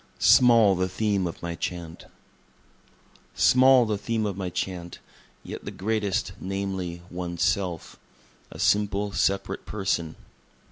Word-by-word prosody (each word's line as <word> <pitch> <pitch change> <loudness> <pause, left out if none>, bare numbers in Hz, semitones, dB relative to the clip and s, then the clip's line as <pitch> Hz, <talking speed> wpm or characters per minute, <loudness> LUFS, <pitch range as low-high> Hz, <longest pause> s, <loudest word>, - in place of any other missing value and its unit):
Small 115 -5 +6
the 95 0 -1
Theme 100 -2 0
of 85 - -8
My 85 0 -3
Chant 85 -1 -6 1.3
Small 130 -1 +5
the 105 -2 -2
theme 110 0 -1
of 100 -3 -2
my 95 -1 -4
Chant, 90 -1 -5 0.5
yet - - -8
the - - -5
greatest 105 -1 -2
namely, 95 -3 -4
One's 85 -1 -3
Self 90 -5 -2 0.5
a - - -11
simple, 105 0 +1
separate 100 0 -1
person. 95 -6 -2
95 Hz, 125 wpm, -25 LUFS, 90-105 Hz, 1.3 s, Small